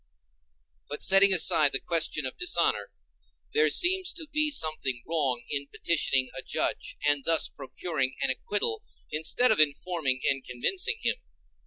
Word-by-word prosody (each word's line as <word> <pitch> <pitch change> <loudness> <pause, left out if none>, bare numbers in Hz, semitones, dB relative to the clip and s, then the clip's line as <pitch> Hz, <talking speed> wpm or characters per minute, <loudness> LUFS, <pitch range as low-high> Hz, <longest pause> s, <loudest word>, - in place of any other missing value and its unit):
But, 145 - -6
setting 195 +1 +7
aside 165 -5 +5
the 135 - 0
question 160 -3 0
of 130 - -6
dishonor, 170 - 0 0.6
there 155 0 +2
seems 365 - +2
to 330 -3 -7
be 305 0 +2
something 155 - -1
wrong 140 -7 -1
in 140 -1 -4
petitioning 135 -6 0
a - - -6
judge, - - -4
and 145 -1 +1
thus 165 0 +2
procuring 135 0 -5
an 135 - +1
acquittal 210 - -2 0.3
instead 160 +11 +1
of 220 - +2
informing 150 -3 0
and 135 -1 -1
convincing 125 - -1
him. - - -1
155 Hz, 145 wpm, -26 LUFS, 135-190 Hz, 0.6 s, setting